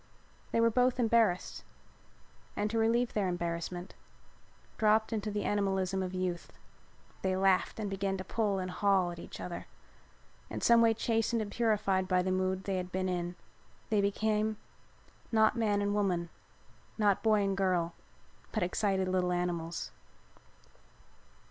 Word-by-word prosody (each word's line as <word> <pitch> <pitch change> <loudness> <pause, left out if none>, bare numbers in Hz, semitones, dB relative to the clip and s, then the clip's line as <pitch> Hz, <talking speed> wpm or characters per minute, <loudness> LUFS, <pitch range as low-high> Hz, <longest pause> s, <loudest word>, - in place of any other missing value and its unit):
They - - +1
were 230 0 +4
both 250 +2 +2
embarrassed 225 -6 +2 0.9
and 210 0 -1
to 225 - 0
relieve 235 +2 +2
their 205 -3 +1
embarrassment 175 0 -3 0.9
dropped 220 +1 +3
into 215 -1 -2
the 205 0 -2
animalism 195 -2 0
of 185 -1 -3
youth. 180 -2 -3 0.7
They 190 -1 0
laughed 190 +2 +2
and 215 - -2
began 195 0 -2
to 185 - -5
pull 205 -1 0
and 185 -1 -3
haul 190 -2 +2
at 170 - -9
each - - -9
other. 175 - -6 0.8
In - - -5
some 235 0 +6
way 225 -1 +4
chastened 225 +1 0
and 210 -2 -4
purified 205 -5 +1
by 180 -1 +2
the 185 - -1
mood 185 0 0
they 195 -1 -1
had 180 0 -4
been 185 0 -1
in, 175 -1 -2 0.6
they 210 -2 +3
became, 215 +1 0 0.7
not 220 0 +4
man 210 -3 +1
and 205 0 0
woman, 180 -5 0 0.7
not 205 -3 +2
boy 215 -2 +3
and 195 -1 0
girl, 180 -3 +1 0.6
but - - 0
excited 190 +1 0
little 185 -1 +1
animals. 175 -2 -2
195 Hz, 150 wpm, -31 LUFS, 185-215 Hz, 0.9 s, some